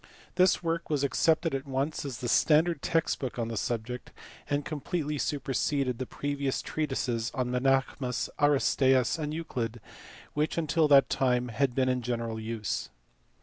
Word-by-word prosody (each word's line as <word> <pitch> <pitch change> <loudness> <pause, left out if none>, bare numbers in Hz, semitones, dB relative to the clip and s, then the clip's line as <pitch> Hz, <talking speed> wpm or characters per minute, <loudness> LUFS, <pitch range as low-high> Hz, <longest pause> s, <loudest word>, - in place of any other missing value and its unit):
This 185 0 +3
work 165 0 -2
was 145 -3 0
accepted 160 +3 +2
at 135 0 -3
once 135 +3 -2
as 135 -4 -4
the 125 - -2
standard 155 +5 +3
text 165 -2 0
book 130 -3 -4
on 115 -1 -2
the 115 - -4
subject, 120 +3 -3 0.4
and 145 -1 0
completely 150 0 -3
superseded 135 -2 -1
the 130 - -3
previous 140 -2 -2
treatises 130 -6 -1
of 130 -2 0
Menaech 135 +2 +2 0.2
mus, 125 -2 -1
Aristaeus, 135 -1 +3
and 150 -1 -2
Euclid 120 -8 -3 0.5
which 150 +2 -1
until 160 -1 +2
that 140 -2 +6
time 125 -2 +1
had 125 +2 0
been 130 -1 +2
in 125 -1 +1
general 115 -2 -3
use. 110 - -3
135 Hz, 155 wpm, -29 LUFS, 125-150 Hz, 0.5 s, that